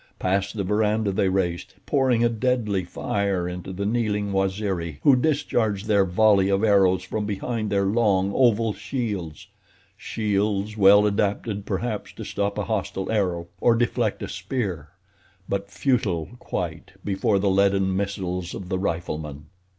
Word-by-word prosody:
Past 100 Hz, +3 st, -1 dB
the 100 Hz, -, 0 dB
veranda 105 Hz, +1 st, +1 dB
they 95 Hz, 0 st, +1 dB
raced, 90 Hz, -2 st, -2 dB
pouring 130 Hz, -4 st, +2 dB
a -, -, +5 dB
deadly 115 Hz, -5 st, 0 dB
fire 95 Hz, 0 st, -2 dB
into 90 Hz, +1 st, -6 dB
the 95 Hz, +2 st, -4 dB
kneeling 105 Hz, -2 st, 0 dB
Waziri 95 Hz, -5 st, -1 dB
who 140 Hz, -, +6 dB
discharged 120 Hz, -7 st, 0 dB
their 100 Hz, -3 st, +3 dB
volley 100 Hz, +1 st, +4 dB
of 100 Hz, +1 st, +1 dB
arrows 95 Hz, -3 st, +4 dB
from 105 Hz, +3 st, -3 dB
behind 110 Hz, +2 st, -2 dB
their 100 Hz, -1 st, +1 dB
long, 100 Hz, -2 st, +2 dB
oval 115 Hz, -4 st, +3 dB
shields—shields 100 Hz, -, -4 dB
well 100 Hz, 0 st, +6 dB
adapted, 100 Hz, 0 st, -1 dB
perhaps, 105 Hz, +2 st, -3 dB
to -, -, -8 dB
stop 100 Hz, 0 st, -2 dB
a 105 Hz, -, 0 dB
hostile 100 Hz, -3 st, -2 dB
arrow, 90 Hz, -6 st, 0 dB
or 120 Hz, -, +4 dB
deflect 120 Hz, -2 st, 0 dB
a -, -, -3 dB
spear; 95 Hz, -, -4 dB, 0.6 s
but 100 Hz, 0 st, -3 dB
futile, 100 Hz, -, 0 dB
quite, 85 Hz, -2 st, -5 dB
before 100 Hz, +1 st, +1 dB
the 95 Hz, 0 st, +1 dB
leaden 95 Hz, -1 st, +2 dB
missiles 90 Hz, -3 st, -3 dB
of 90 Hz, -2 st, -7 dB
the 95 Hz, -, -1 dB
riflemen. 75 Hz, -5 st, -4 dB
100 Hz, 145 wpm, -24 LUFS, 95-110 Hz, 0.6 s, who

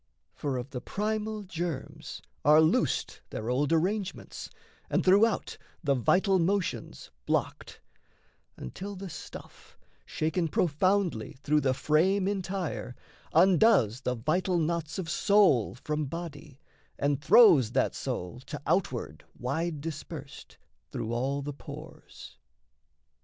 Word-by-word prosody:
For 140 Hz, -3 st, -3 dB
of 125 Hz, +2 st, -6 dB
the 125 Hz, -3 st, -5 dB
primal 215 Hz, +4 st, -2 dB
germs 170 Hz, -6 st, -5 dB, 0.2 s
Are 150 Hz, +2 st, +7 dB
loosed 160 Hz, 0 st, +1 dB
their 110 Hz, +3 st, -4 dB
old 140 Hz, +4 st, +1 dB
arrangements, 190 Hz, +4 st, -1 dB, 0.4 s
and, -, -, +1 dB
throughout, 200 Hz, +4 st, +3 dB, 0.2 s
The 140 Hz, -3 st, +3 dB
vital 185 Hz, -, +3 dB
motions 185 Hz, +1 st, -2 dB, 0.2 s
blocked, -, -, -2 dB, 0.8 s
until 195 Hz, -, -7 dB
the 190 Hz, -1 st, -7 dB
stuff, 145 Hz, -, -11 dB, 0.3 s
Shaken 160 Hz, +2 st, -1 dB
profoundly 175 Hz, -, +1 dB
through 150 Hz, +1 st, +2 dB
the 130 Hz, -2 st, +1 dB
frame 185 Hz, +8 st, +2 dB
entire, 190 Hz, -9 st, -3 dB, 0.4 s
Undoes 175 Hz, -, +4 dB
the 125 Hz, -1 st, -1 dB
vital 175 Hz, +9 st, 0 dB
knots 160 Hz, -2 st, -1 dB
of 185 Hz, -4 st, -4 dB
soul 175 Hz, -, +3 dB
from 150 Hz, +4 st, -3 dB
body 150 Hz, -2 st, -8 dB, 0.4 s
And 140 Hz, 0 st, 0 dB
throws 155 Hz, -, +6 dB
that -, -, +2 dB
soul, 90 Hz, +7 st, -4 dB
to 150 Hz, -, -5 dB
outward 120 Hz, -, -1 dB
wide 155 Hz, +4 st, -2 dB
dispersed, 150 Hz, -2 st, -8 dB, 0.3 s
Through 115 Hz, +1 st, -4 dB
all 135 Hz, +4 st, -1 dB
the 145 Hz, +1 st, -4 dB
pores. -, -, -11 dB
160 Hz, 115 wpm, -29 LUFS, 140-190 Hz, 0.8 s, Are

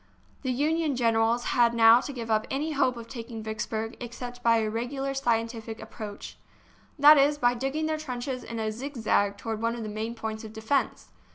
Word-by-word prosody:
The 260 Hz, -, -1 dB
Union 300 Hz, +3 st, +1 dB
generals 230 Hz, 0 st, +2 dB
had 235 Hz, -1 st, +4 dB
now 230 Hz, +1 st, +7 dB
to 285 Hz, -, -5 dB
give 230 Hz, -4 st, -5 dB
up 215 Hz, 0 st, +1 dB
any 295 Hz, +4 st, -2 dB
hope 270 Hz, -4 st, +1 dB
of 230 Hz, -1 st, -8 dB
taking 230 Hz, -2 st, -7 dB
Vicksburg 220 Hz, +1 st, -4 dB
except 245 Hz, 0 st, -7 dB
by 230 Hz, -1 st, +4 dB
a 220 Hz, -1 st, 0 dB
regular 260 Hz, +5 st, -3 dB
scientific 230 Hz, -3 st, -1 dB
approach; 215 Hz, -2 st, -8 dB, 0.6 s
that 295 Hz, +1 st, +8 dB
is, 290 Hz, +2 st, +4 dB
by 245 Hz, -3 st, +3 dB
digging 270 Hz, +6 st, -2 dB
their 310 Hz, 0 st, -1 dB
trenches 255 Hz, -3 st, -4 dB
in 230 Hz, -, -6 dB
a 220 Hz, -1 st, -1 dB
zigzag 220 Hz, -5 st, 0 dB
toward 225 Hz, -1 st, -4 dB
some 230 Hz, +1 st, 0 dB
of 235 Hz, -, -5 dB
the 215 Hz, -, -5 dB
main 220 Hz, +2 st, -4 dB
points 220 Hz, -1 st, -5 dB
of 220 Hz, -1 st, -9 dB
defence. 220 Hz, +6 st, -1 dB
235 Hz, 190 wpm, -27 LUFS, 225-270 Hz, 0.6 s, that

